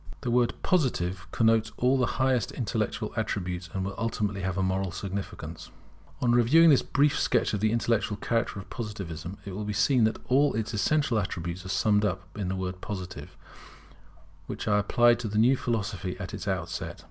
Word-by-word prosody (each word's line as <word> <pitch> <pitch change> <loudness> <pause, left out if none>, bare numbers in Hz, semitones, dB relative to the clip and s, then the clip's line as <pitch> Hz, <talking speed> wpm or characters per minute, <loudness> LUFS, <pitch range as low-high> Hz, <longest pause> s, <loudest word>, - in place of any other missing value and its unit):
[The 120 - -2
word 120 0 +2
Positive 95 - 0
connotes 110 -1 +3
all 125 +2 +3
the 125 -2 +2
highest 130 -2 +1
intellectual 110 -2 -2
attributes, 90 -5 -3
and 95 -1 -2
will 100 - -3
ultimately 105 -3 -1
have 95 0 -2
a 95 - +1
moral 95 +1 0
significance] 95 +2 -6 0.5
On 120 - +3
reviewing 140 +8 +6
this 140 - +5
brief 145 +1 +2
sketch - - +1
of 105 - 0
the 110 +1 +2
intellectual 115 -2 0
character 115 +1 -1
of 95 -1 -7
Positivism, 95 -6 -6
it 100 - -6
will 105 - -4
be 105 0 -3
seen 115 +3 +3
that 110 - 0
all 140 +1 +3
its 110 +1 -2
essential 120 +3 +2
attributes 90 -1 -4
are - - -7
summed 105 +1 +2
up 95 -2 -3
in 100 -3 -3
the 95 - -1
word 90 0 -4
Positive, 95 -3 -7 1.1
which - - -5
I 105 -1 +4
applied 120 +3 +4
to 120 - -3
the 105 0 -2
new 120 +5 +5
philosophy 100 -7 -3
at 95 -1 -6
its - - -6
outset. 90 -3 -3
105 Hz, 185 wpm, -28 LUFS, 95-120 Hz, 1.1 s, reviewing